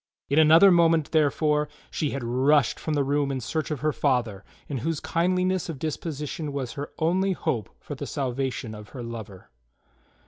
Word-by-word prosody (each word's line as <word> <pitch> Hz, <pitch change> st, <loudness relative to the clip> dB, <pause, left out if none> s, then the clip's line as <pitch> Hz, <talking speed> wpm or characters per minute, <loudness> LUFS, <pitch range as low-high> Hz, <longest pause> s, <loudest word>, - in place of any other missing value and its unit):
In 140 Hz, +3 st, +3 dB
another 165 Hz, +5 st, +7 dB
moment, 165 Hz, -3 st, +3 dB
therefore, 150 Hz, -1 st, +2 dB, 0.2 s
she 150 Hz, -, -1 dB
had 140 Hz, -2 st, -4 dB
rushed 130 Hz, +3 st, +2 dB
from 155 Hz, -, -2 dB
the 145 Hz, -, +2 dB
room 140 Hz, 0 st, 0 dB
in 135 Hz, -, -2 dB
search 155 Hz, +6 st, -3 dB
of 150 Hz, -5 st, -3 dB
her 155 Hz, 0 st, +1 dB
father, 120 Hz, -8 st, 0 dB, 0.2 s
in 140 Hz, -3 st, -3 dB
whose 160 Hz, +3 st, -2 dB
kindliness 180 Hz, +1 st, 0 dB
of 160 Hz, -, -4 dB
dispo 155 Hz, +3 st, -3 dB
sition 150 Hz, +1 st, -4 dB
was 130 Hz, -4 st, -3 dB
her 145 Hz, +1 st, -6 dB
only 185 Hz, +4 st, +1 dB
hope 115 Hz, -, -2 dB
for -, -, -8 dB
the -, -, -6 dB
salvation 130 Hz, -3 st, -3 dB
of 105 Hz, -1 st, -10 dB
her 125 Hz, -3 st, -8 dB
lover. 110 Hz, -5 st, -8 dB
145 Hz, 180 wpm, -26 LUFS, 130-160 Hz, 0.2 s, another